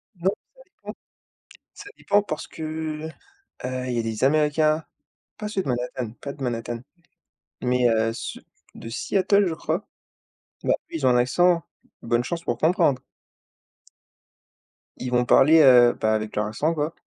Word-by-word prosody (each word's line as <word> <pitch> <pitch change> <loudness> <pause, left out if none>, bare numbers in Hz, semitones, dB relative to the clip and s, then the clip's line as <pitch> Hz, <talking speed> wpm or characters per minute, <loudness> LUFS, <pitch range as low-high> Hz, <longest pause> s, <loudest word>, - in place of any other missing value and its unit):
Non, 185 +3 +1 0.3
ça - - -39
dépend, - - -9 0.8
ça 405 - -11
dépend 205 0 +2
parce 155 -7 -5
que, 160 - -10 1.0
heu, 130 0 -3
il - - -2
y 120 - 0
a - - +2
des 115 +1 -3
Américains, 155 +2 +2 0.5
pas 210 -1 -5
ceux 195 -2 -2
de 140 - -7
Manhattan, 125 -2 -3
pas 140 - -5
de 140 - -10
Manhattan, 120 -1 -3 0.8
mais 125 0 +2
heu, 115 0 +1
ceux - - -6 0.3
de - - -9
Seattle, 195 - +1
je 165 - -1
crois. - - -3 0.8
Bah, - - +3 0.2
eux - - -6
ils 150 -5 -2
ont - - +6
un 125 - +4
accent, 170 +7 +3 0.4
bonne 120 +1 0
chance 170 +6 -4
pour 120 - -2
comprendre. 150 -4 +2 2.0
Ils 125 -1 -4
vont 125 0 +2
parler, 155 +6 +6
heu, 125 -3 +7
bah, 110 0 +2
avec 110 0 -3
leur 105 - 0
accent, 150 +10 -1
quoi. 155 +1 -2
130 Hz, 160 wpm, -24 LUFS, 120-165 Hz, 2.0 s, heu